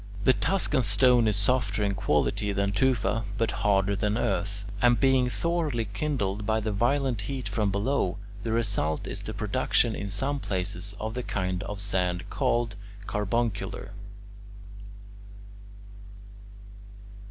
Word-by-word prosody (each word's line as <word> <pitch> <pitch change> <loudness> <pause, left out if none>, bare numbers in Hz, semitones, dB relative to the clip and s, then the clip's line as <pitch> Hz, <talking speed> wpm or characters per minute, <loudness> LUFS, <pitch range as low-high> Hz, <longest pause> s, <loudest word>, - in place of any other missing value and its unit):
The 130 - +6
Tuscan 150 -4 +1
stone 120 +2 +4
is 105 - +2
softer 105 -1 +1
in 100 -1 +1
quality 100 +2 +1
than 100 0 0
tufa 115 0 +1
but 115 0 +1
harder 100 -1 +2
than 105 +2 0
earth, 100 -3 -1 0.2
and 120 -1 +4
being 130 -2 +3
thoroughly 155 -6 -1
kindled 105 -7 -1
by 110 +1 +1
the 110 0 -2
violent 120 +2 +1
heat 135 -2 -3
from 105 -3 0
below, 100 -1 0 0.2
the 110 +1 -3
result 105 -9 0
is - - -4
the - - -6
production - - +1
in 100 - -4
some 135 +8 -1
places 95 -1 -3
of 110 +1 -3
the 125 - -2
kind 95 -5 -2
of 105 0 -5
sand 90 -3 -1
called 120 -2 +1 0.3
carbuncular. 105 -2 -2
105 Hz, 130 wpm, -27 LUFS, 100-120 Hz, 0.3 s, The